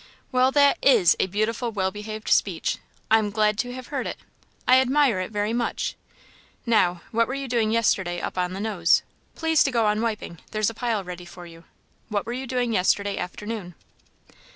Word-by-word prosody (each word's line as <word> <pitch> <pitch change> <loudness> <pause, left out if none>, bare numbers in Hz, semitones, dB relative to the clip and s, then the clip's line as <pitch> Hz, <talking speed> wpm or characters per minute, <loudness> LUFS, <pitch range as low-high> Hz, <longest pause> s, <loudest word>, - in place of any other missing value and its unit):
"Well, 255 +1 +3
that 285 -1 +4
is 220 -11 +5
a - - +2
beautiful, 215 +5 -1
well 190 -3 -1
behaved 215 +1 -7
speech! 180 -5 +1 0.3
I 225 - +7
am 210 -1 -1
glad 210 +1 +2
to 245 - -1
have 255 0 -9
heard - - -3
it. - - -5 0.5
I 255 +1 +7
admire 265 -5 +2
it 185 - -3
very 210 +1 -1
much. 235 0 -2 0.7
Now, 180 -7 +2
what 230 0 +2
were 265 - -3
you 275 -1 -4
doing 230 -3 +1
yesterday 190 -6 +1
up - - -4
on 180 0 -1
the 190 - -5
Nose? 200 -6 +2 0.3
Please 320 -1 +3
to - - +1
go 235 -4 +1
on 210 +1 +1
wiping. 215 -7 -3
There's 215 0 0
a - - -13
pile 225 -3 -1
ready 180 -1 -8
for 175 0 -11
you. 165 -1 -14 0.4
What 205 -2 -1
were 235 - -4
you 260 +1 -5
doing 245 -2 -1
yesterday 200 +1 +1
afternoon?" 185 0 -6
215 Hz, 195 wpm, -24 LUFS, 190-240 Hz, 0.7 s, I